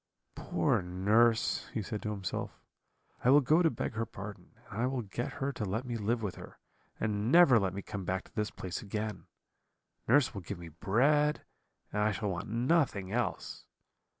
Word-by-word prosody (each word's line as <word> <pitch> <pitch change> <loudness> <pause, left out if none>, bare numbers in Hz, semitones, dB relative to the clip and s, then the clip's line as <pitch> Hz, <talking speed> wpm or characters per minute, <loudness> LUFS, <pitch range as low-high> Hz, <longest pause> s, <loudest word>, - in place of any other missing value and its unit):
"'Poor - - 0
nurse!' 105 +6 +2
he 110 - -1
said 105 +1 -4
to 105 - -3
himself, 100 -4 -4 0.6
'I 125 - +4
will 140 +2 +8
go 155 +6 +4
to 165 - +4
beg 120 - -3
her 110 +1 -1
pardon, 100 0 -9 0.2
and 110 - -3
I 125 - +2
will 130 -2 -2
get 110 +4 -4
her 140 +1 -2
to 115 - -4
let 110 +5 -2
me 120 -1 -3
live 115 +1 -1
with 100 -4 -3
her, - - -11 0.4
and 105 +2 0
never 155 -8 +7
let 95 -2 -1
me 100 - -5
come 100 -3 -5
back 95 +1 -2
to - - -21
this 105 0 -1
place 90 -2 -5
again. 105 0 -4 0.8
Nurse 130 +1 +4
will 100 - -5
give 95 +2 -6
me 85 -1 -9
bread, 140 - +2 0.5
and 105 - 0
I 105 0 +2
shall 105 -1 -2
want 90 +4 -4
nothing 120 - +1
else. 120 +2 -2
110 Hz, 190 wpm, -31 LUFS, 100-125 Hz, 0.8 s, will